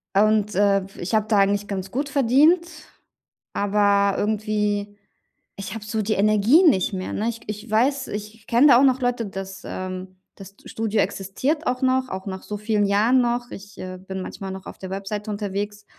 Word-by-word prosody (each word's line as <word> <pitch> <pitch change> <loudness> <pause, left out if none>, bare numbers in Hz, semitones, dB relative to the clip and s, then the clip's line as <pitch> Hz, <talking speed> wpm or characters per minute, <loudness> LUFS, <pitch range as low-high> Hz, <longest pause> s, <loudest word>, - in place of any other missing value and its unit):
Und, 210 0 +3
äh, 200 -1 +3
w - - -13
ich 190 +6 -1
habe 215 0 +1
da 210 -2 +2
eigentlich 200 +1 +2
ganz 190 -2 -4
gut 280 +4 -2
verdient, 290 +6 +4 0.9
aber 200 -1 +2
irgendwie 210 -1 -1 0.6
ich 195 -1 -6
habe 215 -2 -7
so 215 0 -2
die 215 +1 0
Energie 215 - +4
nicht 215 - +3
mehr, 185 0 -4
ne? 220 +2 -1
Ich 230 -1 -6
k - - -18
ich 210 +2 -6
weiß, 260 +5 +1
ich 210 +1 -5
ich 225 0 -24
kenne 240 +5 +5
da 245 -4 +7
auch 275 - +4
noch 260 0 +2
Leute, 245 -2 0
das 195 0 -7
ähm, 185 0 -6 0.2
das 195 0 -12
d - - -16
Studio 220 -1 -1
existiert 205 - -2
auch 250 +1 -1
noch, 260 0 +2
auch 190 0 -6
nach 190 0 -5
so 210 - -5
vielen 210 0 0
Jahren 220 +6 +3
noch. 240 0 -1
Ich, 200 +1 -11
äh, 185 0 -7
bin 190 0 -6
manchmal 195 +1 -6
noch 190 0 -8
auf - - -9
der 190 - -7
Webseite 200 +2 -4
unterwegs. 205 0 -4
210 Hz, 205 wpm, -23 LUFS, 195-235 Hz, 0.9 s, da